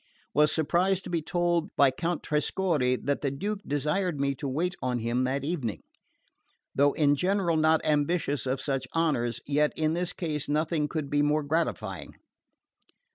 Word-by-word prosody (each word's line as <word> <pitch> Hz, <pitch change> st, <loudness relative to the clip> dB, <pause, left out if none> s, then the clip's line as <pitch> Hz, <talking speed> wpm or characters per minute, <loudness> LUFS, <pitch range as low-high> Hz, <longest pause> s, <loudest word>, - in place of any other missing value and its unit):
Was 150 Hz, +1 st, +4 dB
surprised 180 Hz, +5 st, +1 dB
to -, -, -7 dB
be 170 Hz, -2 st, 0 dB
told 175 Hz, 0 st, 0 dB
by 140 Hz, -2 st, +5 dB
Count 170 Hz, +5 st, -2 dB
Trescorre 150 Hz, -4 st, +1 dB
that 140 Hz, 0 st, 0 dB
the 140 Hz, -, 0 dB
Duke 200 Hz, +10 st, -3 dB
desired 150 Hz, +3 st, 0 dB
me 140 Hz, 0 st, +1 dB
to 140 Hz, +1 st, -5 dB
wait 165 Hz, +7 st, -1 dB
on 125 Hz, -1 st, 0 dB
him 120 Hz, +2 st, 0 dB
that 135 Hz, +2 st, -1 dB
evening. 140 Hz, -8 st, -3 dB, 0.9 s
Though 140 Hz, +1 st, +3 dB
in 145 Hz, -2 st, +3 dB
general 180 Hz, +1 st, +1 dB
not 160 Hz, 0 st, +3 dB
ambitious 145 Hz, -3 st, 0 dB
of 130 Hz, +1 st, -1 dB
such 135 Hz, -2 st, -2 dB
honours, 135 Hz, -8 st, 0 dB
yet 150 Hz, +1 st, +2 dB
in 155 Hz, 0 st, +1 dB
this 175 Hz, 0 st, -1 dB
case 150 Hz, -4 st, -3 dB
nothing 155 Hz, 0 st, 0 dB
could 150 Hz, -3 st, -4 dB
be 145 Hz, 0 st, +3 dB
more 150 Hz, +1 st, +2 dB
gratifying. 110 Hz, -, -2 dB
150 Hz, 165 wpm, -28 LUFS, 140-170 Hz, 0.9 s, by